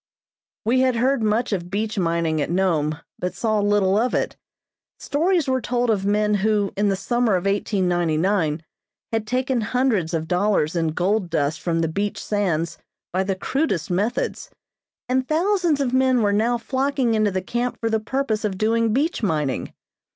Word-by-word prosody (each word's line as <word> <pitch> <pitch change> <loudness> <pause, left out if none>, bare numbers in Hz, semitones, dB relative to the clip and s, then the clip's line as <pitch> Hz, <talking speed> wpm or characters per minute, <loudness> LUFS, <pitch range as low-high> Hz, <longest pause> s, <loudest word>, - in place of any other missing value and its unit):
We 245 +4 +3
had 260 -1 +3
heard 255 +2 +2
much 220 +2 +1
of 175 -2 -3
beach 210 +1 -2
mining 165 -3 0
at - - -2
Nome, 165 -4 +1 0.2
but 180 - -3
saw 215 -2 0
little 205 -1 +2
of 245 +2 0
it. - - -1 0.6
Stories 330 +1 +1
were 260 -1 +1
told 245 0 0
of 195 -2 0
men 210 +1 +2
who, 205 0 +1
in 205 +1 +1
the 195 - +1
summer 240 +2 +1
of 180 +1 -2
1899, 180 -4 +1 0.5
had 225 -1 -1
taken 255 +1 0
hundreds 220 -8 0
of 160 0 -2
dollars 180 -3 +1
in 165 -1 +1
gold 190 +2 0
dust 155 -1 0
from 165 -1 0
the 165 - +1
beach 200 +6 -2
sands 175 -6 -1 0.3
by 190 +1 +1
the 195 0 -1
crudest 195 - -1
methods, 205 +7 -1 0.6
and 255 +1 0
thousands 345 -1 +1
of 260 -3 0
men 260 -2 +3
were 205 -1 +2
now 230 +4 +2
flocking 260 0 0
into 215 -1 +2
the 185 -1 -2
camp 240 +3 -2
for 225 -1 -1
the 220 - +2
purpose 225 -1 -2
of 200 -3 -2
doing 225 +1 +1
beach 295 +5 0
mining. 150 - -1
210 Hz, 175 wpm, -22 LUFS, 180-245 Hz, 0.6 s, We